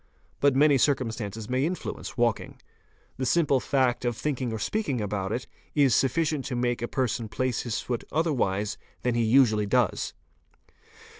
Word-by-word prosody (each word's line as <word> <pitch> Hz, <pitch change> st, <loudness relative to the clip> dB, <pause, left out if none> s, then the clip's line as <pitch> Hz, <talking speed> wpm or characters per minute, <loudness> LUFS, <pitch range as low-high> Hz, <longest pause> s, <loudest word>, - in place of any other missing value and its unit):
But 140 Hz, -2 st, +3 dB
many 145 Hz, 0 st, +5 dB
circumstances 115 Hz, -6 st, -1 dB
may 130 Hz, +2 st, 0 dB
influence 175 Hz, -5 st, -4 dB
walking. 120 Hz, -3 st, 0 dB, 0.6 s
The 130 Hz, -, -2 dB
simple 145 Hz, -6 st, +3 dB
act 130 Hz, -3 st, +2 dB
of 120 Hz, -2 st, -1 dB
thinking 130 Hz, -5 st, -2 dB
or 110 Hz, -, -3 dB
speaking 145 Hz, -, -1 dB
about 100 Hz, -2 st, -2 dB
it, 125 Hz, +3 st, -2 dB, 0.3 s
is 140 Hz, -5 st, +4 dB
sufficient 145 Hz, +3 st, +1 dB
to 125 Hz, -, -3 dB
make 120 Hz, -1 st, 0 dB
a 120 Hz, -, -1 dB
person 120 Hz, -3 st, -1 dB
place 130 Hz, +1 st, -1 dB
his 120 Hz, -3 st, -2 dB
foot 120 Hz, -2 st, -3 dB
otherwise 110 Hz, -, 0 dB, 0.2 s
than 125 Hz, -, +1 dB
he 120 Hz, -, +1 dB
usually 110 Hz, -3 st, +4 dB
does. 120 Hz, -2 st, +1 dB
125 Hz, 155 wpm, -27 LUFS, 110-140 Hz, 0.6 s, many